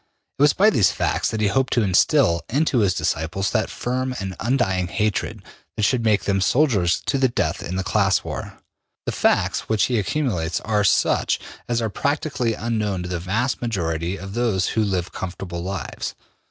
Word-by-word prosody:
It - - -1
was 145 0 +6
by 210 +3 +5
these 105 - +4
facts - - 0
that 110 - -3
he - - +3
hoped 135 +5 +1
to 120 - +3
instil 85 -3 +3
into 140 0 +2
his 95 -5 +2
disciples 85 +6 -1
that 110 -2 0
firm 130 +1 -2
and 95 -1 -4
undying 95 -8 +1
hatred 105 +3 -2 0.3
that 105 - -1
should 120 +2 +2
make 105 -2 +2
them 100 -1 +1
soldiers 100 - +2
to 135 - 0
the 130 - +4
death 120 - -1
in 90 - -4
the 95 - -1
class 95 -1 +2
war. - - -6 0.5
The - - -1
facts - - +1
which 110 -1 +2
he 120 -3 +1
accumulates 100 - -1
are 105 -1 +1
such 100 - +2 0.3
as 120 -1 0
are 110 - 0
practically 140 -3 -1
unknown 105 -5 -2
to 90 - -5
the 90 -1 -2
vast 110 +9 -1
majority 90 -5 -2
of 95 +1 -8
those 110 -6 +1
who 110 - +1
live 95 -4 -1
comfortable 90 -1 -5
lives. 95 +1 -5
105 Hz, 185 wpm, -22 LUFS, 95-120 Hz, 0.5 s, was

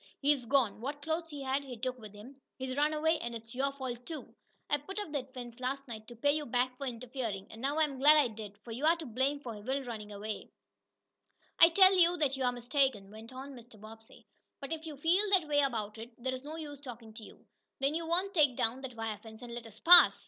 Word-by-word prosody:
"He's 280 -3 +2
gone. 245 -6 +2
What 285 +3 -5
clothes 325 +1 -2
he 290 -3 -7
had 270 +1 0
he 255 -3 -8
took 255 +2 -3
with 215 -2 -11
him. 260 +7 -13 0.2
He's 260 -1 -4
run 295 +2 +2
away, 320 +1 +1
and 235 0 -4
it's 225 0 -9
your 275 +2 0
fault, 255 -3 -6
too. 320 -2 -7 0.3
I 290 - +2
put 385 +8 -9
up 415 -7 -3
that 270 -3 -4
fence 240 -1 -8
last 270 +2 -3
night 220 -2 -8
to 240 - -10
pay 285 +5 +2
you 300 0 -1
back 250 +1 0
for 275 +1 -5
interferin', 235 -5 -4
an' 225 - -10
now 280 +3 0
I'm 295 -4 +1
glad 300 +3 +7
I 290 -4 +5
did, 215 -2 -9
for 235 - -9
you're 300 +8 +3
to 330 -2 -8
blame 265 +4 0
for 230 -6 -7
Will 265 +5 -2
runnin' 220 -4 -7
off." 210 +1 -5 1.1
"I 330 - +10
tell 375 +2 +7
you 350 -1 +4
that 285 -4 +1
you 265 - -3
are 250 - +3
mistaken," 245 -4 0
went 220 +2 -11
on 265 +2 -8
Mr. 240 -3 -14
Bobbsey. 220 +1 -14 0.3
"But 275 +2 -5
if 320 0 -6
you 300 -3 -7
feel 330 +7 +3
that 360 -5 +4
way 290 -1 +2
about 225 -6 -1
it, 230 +1 -8
there 260 +2 -3
is 255 - -5
no 305 +2 -7
use 295 -3 -7
talking 235 -5 -10
to 225 - -10
you. - - -14 0.3
Then 275 +2 +1
you 330 +1 -3
won't 365 +4 0
take 295 -8 +4
down 250 +1 0
that 260 -3 -7
wire 225 -2 -4
fence 220 +1 -12
and 240 -1 -8
let 235 -1 -7
us 220 0 -13
pass?" 350 +4 +9
260 Hz, 245 wpm, -32 LUFS, 230-290 Hz, 1.1 s, I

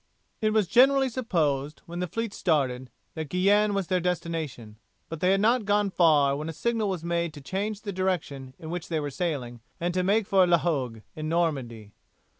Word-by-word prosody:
It 215 - +3
was 215 -2 +3
generally 270 +4 +5
supposed, 155 - -1
when 170 +1 -7
the 180 - -1
fleet 225 +4 -3
started, 130 -6 0 0.2
that 160 -3 -5
Guienne 205 +3 +3
was 195 -2 0
their 185 +1 +1
destination, 160 -11 -3 0.3
but 165 - -6
they 180 - +2
had 195 +1 +3
not 230 +2 +3
gone 205 0 +1
far 150 -6 +4
when 150 +3 -4
a - - -5
signal 225 +3 -1
was 180 -4 -3
made 170 -1 -1
to - - -8
change 200 +8 -3
the 200 -2 -5
direction 155 -8 -2
in 160 -2 -8
which 175 -1 -4
they 160 -2 -1
were 145 -1 -3
sailing 130 -7 -3 0.2
and 175 +1 -1
to 185 - +1
make 200 +4 +2
for 190 -2 +4
La 175 -1 +5
Hogue 130 -10 -2
in 155 0 -4
Normandy. 135 -11 -1
170 Hz, 200 wpm, -27 LUFS, 145-200 Hz, 0.3 s, generally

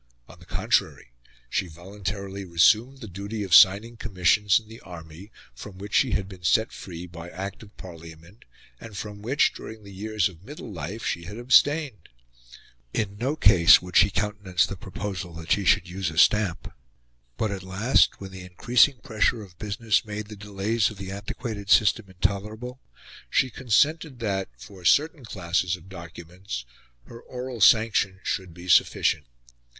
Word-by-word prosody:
On - - -15
the - - -17
contrary, - - -1 0.4
she 90 - -1
voluntarily 95 +3 -6
resumed 110 +9 +3
the 110 - -7
duty 100 +3 -5
of 95 -4 -3
signing 105 +6 +6
commissions 100 -1 +2
in 110 - -19
the 115 +2 -12
army, 85 +2 -12 0.2
from 95 - -11
which 100 +3 -9
she 130 -5 +3
had 95 -2 -1
been 95 -2 -12
set 110 +6 +2
free 90 -2 -8
by 85 0 -10
Act 95 +3 -7
of 105 -2 -16
Parliament, 85 +2 -12 0.4
and 110 -3 -10
from 105 0 -7
which, 130 +7 +2
during 110 -1 -10
the 100 -1 -12
years 105 0 -1
of 90 -2 -14
middle 125 -3 -9
life, 90 +7 -6
she 85 - -2
had 105 +5 -8
abstained. 130 - +2 0.9
In 100 -2 -2
no 135 +6 -1
case 90 - +7
would 90 0 -11
she 95 - +6
countenance 100 -3 0
the 100 - -6
proposal 95 -2 -6
that 80 0 -8
she 100 - +2
should - - +3
use 90 -1 -3
a 80 - -9
stamp. 100 -2 +2 0.6
But, 110 - -1
at 95 -2 -5
last, 95 +7 +2
when 95 -1 -8
the 95 0 -9
increasing 120 +9 +3
pressure 110 0 0
of 90 -3 -17
business 105 +1 0
made 105 -1 -6
the 105 - -8
delays 105 +2 -1
of 105 - -11
the 95 -1 -7
antiquated 100 +1 -6
system 105 -1 +4
intolerable, 105 +7 -3 0.5
she 130 - +1
consented 140 +5 +1
that, 100 -5 -2
for 90 +9 -13
certain 150 - +2
classes 85 -4 -1
of 90 +1 -15
documents, 85 -5 -8 0.4
her 115 - -12
oral 125 -2 -7
sanction 105 -3 +4
should 95 -2 -3
be 85 +2 -12
sufficient. 75 -4 +3
100 Hz, 165 wpm, -25 LUFS, 90-110 Hz, 0.9 s, case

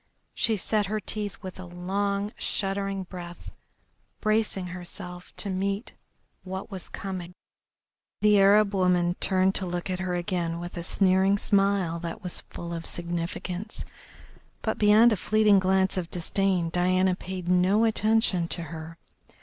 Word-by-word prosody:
She 220 -2 +1
set 210 +1 0
her 215 +2 -1
teeth 205 -1 -4
with 185 0 -7
a 185 - -7
long, 200 +3 -2
shuddering 195 0 -2
breath, 175 -1 -9 0.7
bracing 215 -3 0
herself 180 0 -8
to - - -3
meet 195 +4 -2 0.5
what 190 +2 -6
was 190 -2 -7
coming. 185 -2 -6 0.9
The 210 -1 +5
Arab 200 +1 +5
woman 180 -2 +2
turned 190 0 +2
to 190 - -3
look 175 +1 -3
at 185 - -2
her 185 -1 -1
again 175 -2 -2
with 175 0 -7
a 175 - -3
sneering 190 +2 +3
smile 195 -5 +2
that 170 +4 -6
was 180 - -1
full 170 0 -6
of 165 -1 -5
significance, 175 +3 -4 0.8
but 220 - -1
beyond 215 +2 +6
a - - -1
fleeting 210 +1 +4
glance 190 0 +2
of 175 -2 -2
disdain 180 -1 0
Diana 185 +1 +2
paid 185 -1 -6
no 180 +4 +4
attention 220 -5 +2
to 170 - -1
her. 165 +1 -8
185 Hz, 145 wpm, -27 LUFS, 175-200 Hz, 0.9 s, beyond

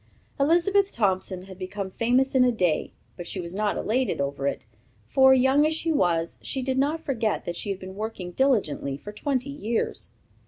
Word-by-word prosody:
Elizabeth 365 +7 +3
Thompson 190 -3 0
had 190 -1 -12
become 190 +1 -5
famous 250 +6 +2
in 260 -1 +5
a 250 - +4
day, 180 -8 0 0.3
but 175 - -6
she 190 - -3
was 170 -1 -5
not 205 +1 0
elated 250 +4 0
over 140 0 -1
it; 135 - -3 0.4
for, 265 - +6
young 265 +2 +5
as 310 +1 +2
she 325 +1 0
was, 170 - +1
she 265 - -3
did 265 0 0
not 305 +4 0
forget 225 -6 -1
that 175 - -3
she 205 - -5
had 195 - -1
been 190 0 -9
working 205 -4 -5
diligently 175 - +1
for 205 +9 -9
twenty 270 +4 -2
years. 235 -5 -2
220 Hz, 190 wpm, -26 LUFS, 185-265 Hz, 0.4 s, for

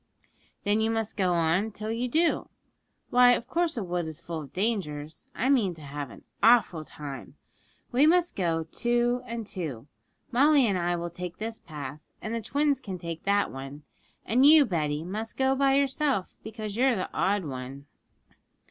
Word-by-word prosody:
'Then 210 +1 +2
you 220 - +2
must 225 -1 -2
go 185 -3 +1
on 170 +5 +2
till 215 +1 -5
you 235 +2 -1
do. 325 +6 +1 0.6
Why, 245 0 +7
of 240 - -1
course 330 +2 0
a 220 - -1
wood 175 -2 -2
is 160 -2 -7
full 165 -2 -5
of 140 -3 -11
dangers. 165 -8 -3
I 250 - 0
mean 225 -10 +3
to 155 - -12
have 145 -1 -6
an - - -13 0.2
awful 220 -9 +4
time. 145 -3 -9 0.6
We 265 +5 +5
must 350 +1 +3
go 165 -4 0
two 240 +7 0
and 230 -1 -4
two; 155 - -5 0.5
Molly 280 +2 +5
and 200 -4 +1
I 175 0 0
will 170 0 -4
take 180 0 -6
this 225 +1 -5
path, 145 -2 -7 0.2
and 215 - -5
the 230 - -2
twins 285 +3 +1
can 190 -3 -5
take 170 -1 -7
that 200 +1 +2
one, 135 +2 -8 0.4
and 250 +4 +3
you, 300 0 +8
Betty, 155 - -1
must 215 +6 -5
go 265 0 +3
by 270 0 +3
yourself, 275 -6 +1
because 215 -2 -6
you're 255 +1 +3
the 185 - -4
odd 195 -1 +1
one.' 135 0 -7
205 Hz, 180 wpm, -27 LUFS, 165-245 Hz, 0.6 s, you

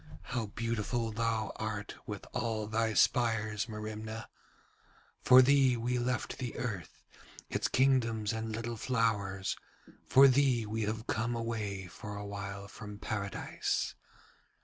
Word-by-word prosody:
'How 120 -4 -2
beautiful 115 +1 -1
thou 110 -1 0
art 110 -2 -3
with - - -5
all 110 -2 -1
thy 110 0 0
spires, 110 -1 +2
Merimna. 110 +1 -5 0.9
For 130 0 +8
thee 135 -2 +5
we 120 +2 0
left 120 -1 -2
the 125 -3 -4
earth, 105 -8 -5 0.5
its - - +1
kingdoms 115 -5 +2
and 110 0 -3
little 115 +1 -3
flowers, 105 -5 0 0.5
for 135 +1 +8
thee 130 -3 +3
we 110 +1 -2
have 110 +1 -3
come 115 +2 -1
away 110 -4 -3
for 100 +3 -8
awhile 100 -1 -5
from 105 -1 -9
Paradise. 100 -1 -2
110 Hz, 125 wpm, -32 LUFS, 105-120 Hz, 0.9 s, For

